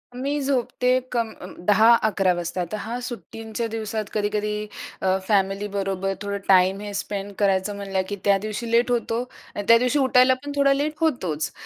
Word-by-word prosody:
मी 280 +3 -2
झोपते 250 -2 0 0.2
कम 235 -2 0
अं, 180 - -9
10-11 215 -3 +4
वाजता. 175 +1 -3
तर 215 - -2
हा 230 +3 -4
सुट्टींच्या 225 0 -5
दिवसात, 220 -1 -3
कधी-कधी 210 0 -1 0.3
अ, 190 0 +2
फॅमिलीबरोबर 195 -1 0
थोडं 200 0 -3
टाईम 190 +1 +5
हे 205 -1 -6
स्पेंड 200 0 -4
करायचं 195 0 +1
म्हणलं, 195 -1 -2
की 205 - -2
त्या 200 -1 +5
दिवशी 215 +3 -5
लेट 235 +1 +3
होतो 235 -1 0 0.3
आणि 205 - -3
त्या 230 - +8
दिवशी 250 +5 +1
उठायला 260 -1 +5
पण 290 - -5
थोडा 280 -1 +4
लेट 290 +2 -1
होतोच. 185 - 0
210 Hz, 165 wpm, -24 LUFS, 195-240 Hz, 0.3 s, त्या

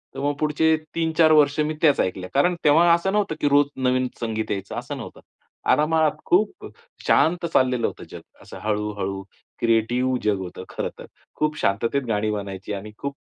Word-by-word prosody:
तर - - -6
मग 145 +1 0
पुढचे 155 +1 +2 0.2
3-4 160 -1 +3
वर्ष 150 -1 +4
मी 150 +1 +1
त्याच 150 -4 +4
ऐकल्या. 95 0 -2
कारण 175 +6 +3
तेव्हा 165 +3 +5
असं 170 +3 +1
नव्हतं 205 -6 0
की - - +2
रोज 145 +1 +5 0.2
नवीन 130 0 +2
संगीत 110 -2 -3
यायचं, 100 -1 -4
असं - - -5
नव्हतं. - - -9 0.5
आरामात 155 0 +3
खूप 200 +4 +1 0.4
शांत 170 +2 +3
चाललेलं 125 -3 +2
होतं - - -8
जग. - - -9 0.2
असं - - -11
हळू-हळू 105 -2 -2 0.4
क्रिएटिव 120 +3 +1
जग 105 -2 +1
होतं 90 0 -7
खरंतर. - - -6 0.3
खूप 150 0 -1
शांततेत 115 +7 0
गाणी 110 -1 0
बनायची 100 -1 -5
आणि 100 +2 -6
खूप 140 0 -5
135 Hz, 165 wpm, -23 LUFS, 105-155 Hz, 0.5 s, तेव्हा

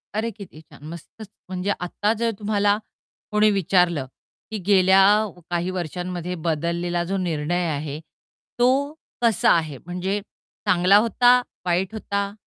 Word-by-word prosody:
अरे, 220 +2 -1
किती 200 -7 -12
छान 155 -2 -18
मस्तच! 170 +6 -11 0.2
म्हणजे 185 +2 -2
आता 205 +4 -1
जर 230 0 +1
तुम्हाला 205 -1 +1 0.5
कोणी 210 0 +4
विचारलं, 180 -6 +2 0.5
की 220 - -3
गेल्या 190 -1 +5 0.5
काही 175 +1 -1
वर्षांमध्ये 180 0 -4
बदललेला 170 +2 -1
जो 195 +2 -2
निर्णय 175 0 -1
आहे 145 0 -5 0.6
तो 245 - +5 0.5
कसा 230 -6 +3
आहे 155 -4 -2
म्हणजे 180 +3 -2 0.5
चांगला 185 +3 +5
होता, 245 +3 +4 0.2
वाईट 180 +3 0
होता? 200 -2 -3
185 Hz, 125 wpm, -23 LUFS, 170-205 Hz, 0.6 s, गेल्या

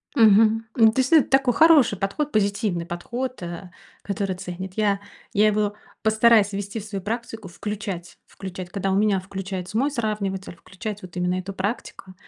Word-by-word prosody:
Мгм. 220 0 +5
Н 225 -2 +7
действительно, 260 +5 +1
это 315 -4 +5
такой 270 -2 +3
хороший 300 - +5
подход, 240 +11 -2
позитивный 200 -4 0
подход, 240 +9 -5
э, 175 +2 -7 0.3
который 195 -1 -2
ценит. 180 +1 -7
Я 205 -2 +1 0.3
я 210 +1 +4
его 210 -1 +1 0.3
постараюсь 220 -1 +4
ввести 200 +2 -4
в 210 - -9
свою 200 -3 -5
практику, 225 -1 -5
включать 195 -2 -6
включать, 185 -2 -8
когда 195 +1 -2
у 190 - +2
меня 205 -1 +3
включается 190 0 -5
мой 275 +5 +1
сравниватель, 205 -7 -3
включать 200 +4 -7
вот 180 -1 -10
именно 180 0 0
эту 190 +2 -6
практику. 190 -1 -5
205 Hz, 160 wpm, -24 LUFS, 190-225 Hz, 0.3 s, Н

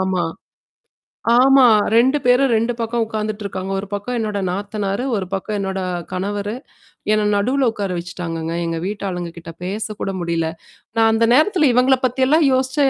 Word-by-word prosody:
ஆமா. 190 -2 0 1.2
ஆமா. 270 0 +6 0.3
2 260 +5 +4
பேரும் 250 +2 +4
2 230 +2 +1
பக்கம் 230 0 -1
உட்காந்துட்டுருக்காங்க. 210 -3 -4
1 205 - -8
பக்கம் 205 +5 -3
என்னோட 210 -2 -2
நாத்தனாரு, 200 +3 -3
1 190 -2 -3
பக்கம் 205 +2 -3
என்னோட 190 -1 -2 0.3
கணவரு. 205 +3 -3 0.6
என்ன 215 -1 +2
நடுவுல 255 +5 +1
உட்கார 205 -3 -4
வச்சுட்டாங்கங்க. 165 -2 -5
எங்க 165 0 -2
வீட்டு 205 -1 -4
ஆளுங்க 175 -1 -4
கிட்ட 165 0 -8
பேசக்கூட 205 +1 -3
முடில. 165 -1 -1 0.5
நான் 225 0 +5
அந்த 230 0 +3
நேரத்தல 310 0 +4
இவங்கள 255 +2 +4
பத்தியெல்லாம் 265 +5 +3
யோசிச்சேன் 260 +2 +2
215 Hz, 145 wpm, -20 LUFS, 190-250 Hz, 1.2 s, ஆமா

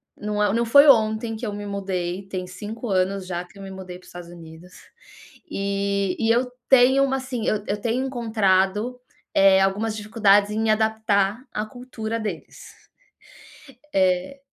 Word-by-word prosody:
não 210 0 -2
é 210 - +3
o - - 0
não 235 +1 +1
foi 280 +6 +6
ontem 220 -2 +3
que 220 - -10
eu 210 - -3
me 205 0 -6
mudei, 190 -2 -3
tem 185 -2 -4
5 210 +6 -7
anos 190 0 0
já 175 -1 -4
que 180 - -20
eu 195 - -10
me 195 - -8
mudei 185 -1 -8
para 180 - -21
os - - -16
Estados 175 -1 -10
Unidos, 170 +1 -13 0.8
eh, 200 -1 -1
e 225 - +1
eu 250 +1 0 0.2
tenho 265 +1 +6
uma 270 -1 +1
assim, 260 -4 -4
eu 210 -1 0
eu 205 +1 -2
tenho 240 +4 -1
encontrado, 220 -2 0 0.3
eh, 195 -1 +5
algumas 210 +3 0
dificuldades 205 -1 +3
em 215 - -2
me 225 - 0
adaptar 220 0 +1
a 210 - -3
cultura 230 -1 -6
deles. 200 -7 -7 1.2
Eh 185 +7 +1
205 Hz, 175 wpm, -23 LUFS, 190-225 Hz, 1.2 s, foi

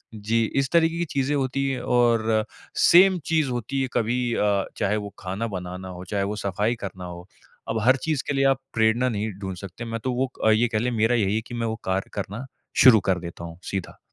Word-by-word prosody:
जी, 110 +2 0
इस 135 -1 +1
तरीके 165 0 +3
की 175 - 0
चीज़ें 140 +2 0
होती 135 0 0
हैं 130 -2 -2
और 115 -2 +2 0.3
सेम 185 +2 +6
चीज़ 155 -4 +1
होती 125 +3 -2
है 130 - 0
कभी 120 +1 0
अ, 100 -2 +1
चाहे 105 +1 +1
वो 105 -1 -6
खाना 95 +5 -3
बनाना 90 +1 -7
हो, 90 0 -8
चाहे 100 +1 -1
वो 105 +2 -2
सफाई 105 +5 0
करना 95 -1 -7
हो। 90 +1 -9 0.4
अब 115 0 0
हर 130 +4 +5
चीज़ 155 -4 0
के - - 0
लिए 135 0 +2
आप 135 -1 +3
प्रेरणा 115 +3 +2
नहीं 110 -1 -2
ढूँढ 95 -1 -4
सकते। 100 +5 -8
मैं 115 0 -4
तो 130 -1 -1
वो 130 +1 -1
अ, - - +6
ये 115 +3 +4
कह 110 -2 0
लें 125 +2 0
मेरा 115 +1 +2
यही 105 -2 +1
है 110 - 0
कि - - -9
मैं 115 -1 -1
वो 110 - -2
कार्य 95 +1 -1
करना 105 +5 -5 0.4
शुरू 120 -4 +9
कर 90 -2 +2
देता 85 0 -8
हूँ 85 0 -9
सीधा। 95 -3 -4
115 Hz, 230 wpm, -24 LUFS, 100-130 Hz, 0.4 s, शुरू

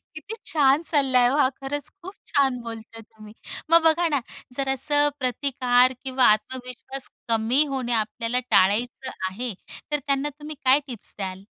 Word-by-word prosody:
किती 400 +8 -7 0.2
छान 285 -1 +4
सल्ला 275 -5 +3
आहे 245 0 +5
हो 270 - +1
हा. 290 -3 +4
खरंच 280 +2 -4
खूप 375 +3 -9
छान 270 -3 +1
बोलताय 225 0 -9
तुम्ही. 215 -1 -15 0.4
मग 335 0 +7
बघा 330 +2 +3
ना, 285 -4 0 0.4
जरा 270 -1 0
असं 290 +2 +2
प्रतिकार 255 -1 +2
किंवा 260 -1 +1
आत्मविश्वास 250 +4 -4 0.2
कमी 230 +6 +2
होणे 260 -4 -3
आपल्याला 230 +2 -1
टाळायचं 225 +7 +2 0.2
आहे, 235 +5 -4 0.4
तर 295 - +2
त्यांना 275 +1 0
तुम्ही 300 0 -8
काय 265 +3 +5
टिप्स 240 -6 -6
द्याल? 190 -1 -5
260 Hz, 155 wpm, -24 LUFS, 235-285 Hz, 0.4 s, मग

